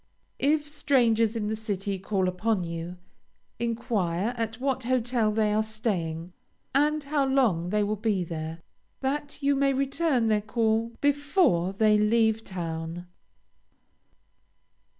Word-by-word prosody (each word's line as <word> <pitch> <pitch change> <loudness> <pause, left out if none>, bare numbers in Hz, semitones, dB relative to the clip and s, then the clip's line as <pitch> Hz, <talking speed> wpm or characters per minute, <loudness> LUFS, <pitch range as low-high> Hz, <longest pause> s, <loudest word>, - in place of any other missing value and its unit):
If 295 +1 +2
strangers 235 -7 +2
in 215 -2 -2
the 220 - -1
city 200 -3 -3
call 190 -1 0
upon 185 +2 0
you, 170 +1 -5 0.6
enquire 225 -4 -1
at 225 0 -3
what 260 -2 -1
hotel 245 -3 +1
they 210 -1 +1
are 215 - +3
staying, 185 -7 -3 0.4
and 300 +2 +2
how 285 0 0
long 225 -11 +2
they 210 +2 +1
will 210 +1 0
be 205 -3 0
there, 165 0 -6 0.4
that 285 +2 -3
you 280 0 +3
may 275 0 +2
return 275 -1 +1
their 215 -1 +2
call 225 +1 0
before 285 - +2
they 210 +1 +3
leave 220 +1 +2
town. 165 -2 -5
220 Hz, 130 wpm, -27 LUFS, 190-260 Hz, 0.6 s, are